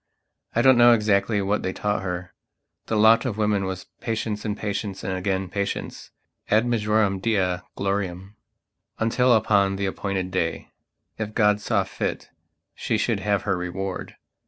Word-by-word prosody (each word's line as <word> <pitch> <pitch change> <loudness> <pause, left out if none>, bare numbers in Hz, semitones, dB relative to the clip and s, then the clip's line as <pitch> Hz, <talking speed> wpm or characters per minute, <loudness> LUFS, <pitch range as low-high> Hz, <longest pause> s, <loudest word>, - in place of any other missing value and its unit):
I 120 - +3
don't 130 -2 +6
know 120 0 +8
exactly 105 -1 +2
what 100 +2 0
they 95 - -2
taught 105 -2 -1
her. 90 -1 -5 0.5
The 110 - -1
lot 110 +2 +6
of 120 -5 -3
women 105 -2 +1
was 95 -1 -5
patience 110 -2 -3
and 105 -1 -2
patience 100 -1 -4
and 95 - -2
again 95 0 -1
patiencead 100 +2 -4 0.6
majorem 105 -4 +1
Dei 95 -4 +1 0.2
gloriamuntil 100 +5 -1
upon 100 -2 +2
the 100 0 -2
appointed 95 -1 -3
day, 85 -3 -2 0.5
if 105 -1 -4
God 105 -2 +3
saw 100 -2 +1
fit, - - -4 0.4
she - - -1
should - - 0
have 105 -1 0
her 100 -2 0
reward. 90 +2 -5
100 Hz, 145 wpm, -24 LUFS, 95-110 Hz, 0.6 s, know